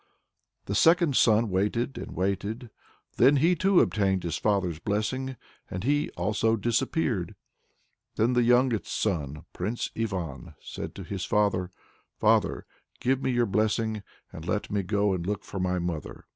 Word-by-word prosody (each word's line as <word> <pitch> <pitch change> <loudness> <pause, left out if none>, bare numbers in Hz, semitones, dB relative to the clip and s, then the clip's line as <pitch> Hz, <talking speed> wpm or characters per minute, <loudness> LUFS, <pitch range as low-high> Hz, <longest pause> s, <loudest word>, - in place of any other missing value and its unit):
The 100 - -3
second 165 - +4
son 110 -2 +4
waited 105 +7 0
and - - -7
waited, 100 +5 -2 0.5
then 140 - +6
he 165 +6 +4
too 185 +2 +4
obtained 95 -3 +1
his 85 - -2
father's 95 -6 0
blessing 130 +7 -2 0.3
and 90 +1 -5
he 145 +4 +1
also 105 +5 +1
disappeared. 120 - -1 0.8
Then 115 +3 +2
the 125 - +3
youngest 120 -1 +3
son, 75 -6 -2
Prince 105 +7 -3
Ivan, 90 - -4
said - - -7
to - - -7
his 95 -2 -5
father, 100 -4 +1 0.5
"Father, - - +2 0.3
give 130 +1 +1
me - - 0
your 120 -1 +2
blessing, 110 +1 0 0.3
and 80 - -8
let 105 +3 -2
me 100 -1 +1
go 100 +1 +1
and 90 -2 -2
look 100 +3 -3
for 100 - -6
my 90 0 0
mother." 85 -4 -4
105 Hz, 150 wpm, -27 LUFS, 95-120 Hz, 0.8 s, then